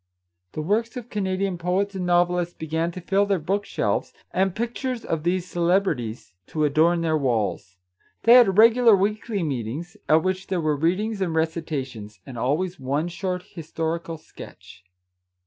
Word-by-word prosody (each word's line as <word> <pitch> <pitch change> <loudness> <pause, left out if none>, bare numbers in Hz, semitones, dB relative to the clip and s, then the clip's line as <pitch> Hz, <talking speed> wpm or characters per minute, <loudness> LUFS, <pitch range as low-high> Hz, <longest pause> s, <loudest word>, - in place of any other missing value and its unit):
The 155 - -3
works 225 +8 0
of 245 -1 -8
Canadian 190 -2 -1
poets 190 +4 0
and 185 -2 -3
novelists 175 0 +2
began 160 +1 -2
to 180 - -7
fill 195 +3 +1
their 200 -1 +2
book 195 +5 -1
shelves, - - -1 0.2
and 190 -1 +1
pictures 240 +2 -3
of 165 -2 -1
these 175 +2 0
celeb 180 +2 +2
rities 120 - -4
to 155 - -2
adorn 165 +4 +3
their 160 -1 +1
walls. 110 -8 -1 0.5
They 230 - +7
had 230 -6 +6
regular 230 0 +7
weekly 205 0 -1
meetings, 145 - -4
at 155 +1 +5
which 185 0 -2
there 185 - -1
were 155 -2 +1
readings 195 +8 0
and 170 -4 -1
recitations, 135 - -3
and 130 - -9
always 150 +10 -1
one 140 +6 -1
short 180 +1 -3
historical 165 -2 -4
sketch. 90 - -13
175 Hz, 160 wpm, -24 LUFS, 155-195 Hz, 0.5 s, They